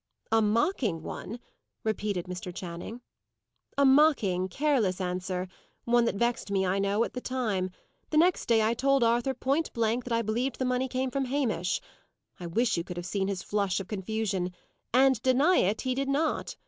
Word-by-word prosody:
"A 225 0 +4
mocking 215 - +1
one!" 230 +8 -6 0.4
repeated 210 -4 -1
Mr. 180 0 -6
Channing. 180 +6 -7 0.8
"A 280 - +5
mocking, 265 - +4
careless 235 -5 +1
answer; 180 0 -2 0.4
one 240 0 +3
that 230 - 0
vexed 235 +1 0
me, 195 -1 +1
I 190 +2 +1
know, 200 +3 +2
at - - -4
the 250 - -5
time. 215 -9 -1 0.4
The 310 - 0
next 350 +3 +3
day 225 -2 +4
I 220 +2 +2
told 275 +2 +2
Arthur, 240 +3 +2
point 275 +6 0
blank, 230 +1 0
that 245 - -2
I 230 0 +1
believed 235 +4 -1
the 260 - -1
money 250 +1 0
came 255 0 -2
from 275 0 -1
Hamish. 240 - -1 0.6
I 175 - -5
wish 225 +6 +1
you 170 - -1
could 175 0 -8
have 175 - -4
seen 190 +1 -1
his 195 -2 -3
flush 200 -3 0
of 195 - -6
confusion! 195 -2 -2 0.4
and, 260 -1 +4
deny 270 +8 +4
it, 205 +4 +2
he 255 -1 -1
did 275 +1 -2
not. 300 +3 0
225 Hz, 185 wpm, -28 LUFS, 190-260 Hz, 0.8 s, A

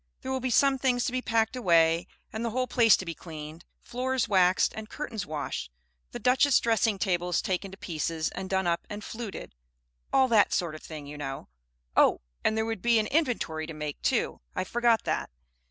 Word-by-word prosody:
There 260 - -4
will 265 - 0
be 255 0 -2
some 270 +2 +3
things 250 -2 +1
to - - -1
be 255 0 -1
packed 225 0 +1
away, 170 -6 +3 0.3
and 220 +2 -3
the 235 - 0
whole 255 +3 0
place 235 -3 +5
to 185 - -6
be 170 - -4
cleaned, 155 0 -9 0.2
floors 255 0 -1
waxed 185 -2 +3
and 220 0 -8
curtains 225 -10 -5
washed, 145 - -4 0.4
the - - -6
Duchesse 260 +2 +4
dressing 225 -2 +1
tables 180 -3 0
taken 190 +1 -2
to 190 - -11
pieces 160 -2 -2
and 190 0 -6
done 190 -1 +1
up 170 -1 -1
and 205 0 -6
fluted, 225 -2 -7 0.6
all 265 -1 +4
that 220 -3 +4
sort 170 -4 0
of 155 - -9
thing, 155 -3 -8
you 145 +1 -9
know. 135 - -6 0.5
Oh! - - +4 0.2
and 220 - +2
there 220 - +1
would 225 -4 -3
be 235 -1 +4
an 215 - +2
inventory 225 - 0
to 165 - -7
make, 150 -1 -5
too; - - 0
I - - 0
forgot 235 +3 +2
that. - - -2
205 Hz, 205 wpm, -28 LUFS, 165-240 Hz, 0.6 s, place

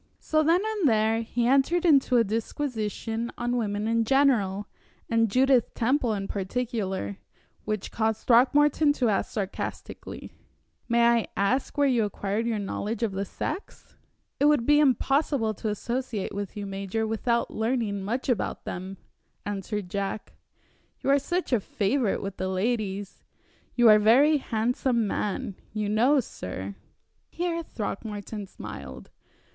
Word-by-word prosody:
So 310 0 +1
then 335 +5 +3
and 425 -9 +1
there 220 0 +2
he 235 +1 -1
entered 275 +8 +3
into 275 -6 +5
a 230 - +5
disquisition 225 0 -3
on 240 0 -1
women 210 -2 -1
in 230 0 +2
general 220 -7 +2 0.5
and 230 -1 +3
Judith 255 +1 +3
Temple 245 -1 +1
in 195 -1 -4
particular, 195 - -3 0.5
which 215 -2 -3
caused 220 -1 -1
Throckmorton 290 +4 +4
to 250 -5 +1
ask 200 - 0
sarcastically: 200 -2 -5 0.6
"May 235 0 +4
I 235 -1 +3
ask 245 +10 0
where 285 - +4
you 245 -4 +2
acquired 205 +2 -2
your 230 -2 0
knowledge 210 +3 -3
of 225 - +1
the 195 +1 -3
sex?" 380 - -6 0.4
"It 285 - +3
would 295 -5 +4
be 295 +2 +5
impossible 270 -3 +2
to 215 +2 -4
associate 235 0 -3
with 200 0 -5
you, 205 - -4
major, 195 +3 -3
without 235 +2 0
learning 220 -3 -1
much 230 +7 -3
about 245 -6 -1
them," 190 +2 -6 0.5
answered 205 -1 -3
Jack, 200 +3 -4 0.7
"you 275 - +1
are 280 - +5
such 345 +1 -2
a 240 - +4
favorite 205 +3 0
with 195 -1 -5
the 185 - -2
ladies. 200 0 -2 0.5
You 240 -2 +5
are 215 - +9
a - - +2
very 265 +9 +5
handsome 235 -1 0
man, 200 -1 -3 0.2
you 210 -1 -1
know, 240 +8 +4
sir 95 - -6 0.3
" - - -48 0.3
Here 340 -1 -2
Throckmorton 210 - -5
smiled. 65 - -9
225 Hz, 145 wpm, -27 LUFS, 205-260 Hz, 0.7 s, are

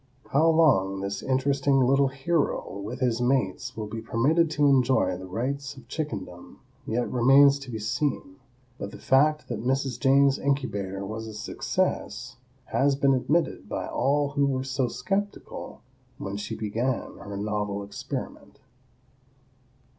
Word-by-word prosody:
How 155 +4 +4
long 100 -13 +3
this 100 0 -3
interesting 135 +1 +2
little 135 +2 +4
hero, 135 - -1
with 120 +6 -6
his 120 -2 +1
mates, 125 -1 0
will 110 - -3
be 110 +2 -6
permitted 150 +9 +2
to 150 -1 +1
enjoy 130 -9 +3
the 95 +1 -8
rights 135 +7 -3
of 120 -2 -14
chickendom 100 - -6 0.3
yet 120 +2 0
remains 135 +3 +6
to 135 -2 -10
be 115 - -4
seen, 140 +5 -2 0.4
but 100 - -4
the - - -10
fact 150 +3 +3
that 115 -2 -4
"Mrs. 135 0 0
Jane's 140 0 +4
incubator 100 -9 -2
was 110 +2 -5
a 110 - -8
success" 110 +2 -2 0.3
has 140 0 +2
been 140 0 +3
admitted 150 +6 0
by - - -3
all 140 +2 +1
who 140 -1 +1
were 130 -1 -1
so 130 -1 -1
skeptical 195 - -4 0.4
when 100 +1 -5
she 105 +2 -4
began 115 +4 -2
her 100 -1 -7
novel 105 -1 -2
experiment. 100 - -7
130 Hz, 145 wpm, -26 LUFS, 110-140 Hz, 0.4 s, remains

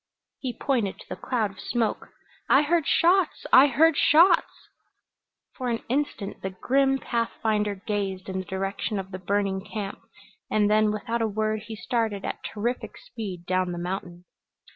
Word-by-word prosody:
He 250 -3 -4
pointed 235 -9 0
to - - -14
the - - -4
cloud 225 -6 -1
of 195 - -17
smoke. 230 -3 -1 0.4
"I 275 - +6
heard 330 0 +1
shots 355 0 +3
I 265 +2 +9
heard 310 +4 +4
shots 330 +6 +4 0.4
" - - -61
For 255 -2 -3
an 230 -1 -2
instant 255 -6 -2
the 190 - -3
grim 270 +8 +2
pathfinder 220 -4 -1
gazed 195 -1 -3
in 190 -1 -3
the 185 - -5
direction 195 +3 -3
of 190 0 -5
the 185 - -6
burning 195 0 -1
camp, 205 -2 -5 0.5
and 210 -1 +2
then 215 0 +4
without 230 +2 -2
a 225 - +2
word 215 0 -2
he 225 - -6
started 220 -3 -2
at - - -5
terrific 235 +4 -3
speed 200 - -7
down 185 0 0
the - - -5
mountain. 175 0 -5
215 Hz, 165 wpm, -26 LUFS, 195-250 Hz, 0.5 s, I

